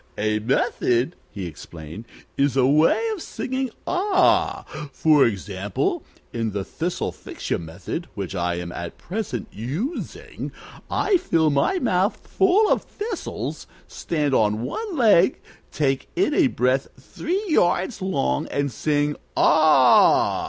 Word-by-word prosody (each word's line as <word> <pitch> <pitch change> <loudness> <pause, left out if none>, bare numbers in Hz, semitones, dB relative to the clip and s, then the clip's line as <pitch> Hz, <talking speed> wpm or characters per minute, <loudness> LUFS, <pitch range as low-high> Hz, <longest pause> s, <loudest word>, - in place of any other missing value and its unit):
"A 110 +1 0
method," 125 +4 0
he 95 -3 -6
explained, 80 +4 -9 0.3
"is 140 -1 +1
a 130 - +4
way 150 +4 +4
of 400 - -7
singing 260 -2 -3 0.2
'Ah!' 370 0 +2 0.3
For 150 0 +4
example, 100 -2 -2 0.3
in 115 -3 -2
the 100 -1 -2
Thistlefixu 170 +2 -4
Method, 85 - -6
which 100 -3 -5
I 90 -2 -1
am 85 0 -5
at 85 0 -7
present 180 - -4
using, 150 - -5 0.4
I 400 - +2
fill 165 - +1
my 145 - +2
mouth 195 - +1
full 385 +3 +3
of - - +3
thistles, 420 -2 -5 0.2
stand 150 -4 -2
on 110 -1 +2
one 415 - -4
leg, 210 -8 +4 0.3
take 135 -3 -1
in 360 -3 +2
a 305 -2 +4
breath 130 - +1
three 355 - -3
yards 190 - +1
long, 65 - 0
and 140 -1 -1
sing 145 +4 0 0.2
'Ah!' 150 -5 +5
145 Hz, 125 wpm, -23 LUFS, -, 0.4 s, Ah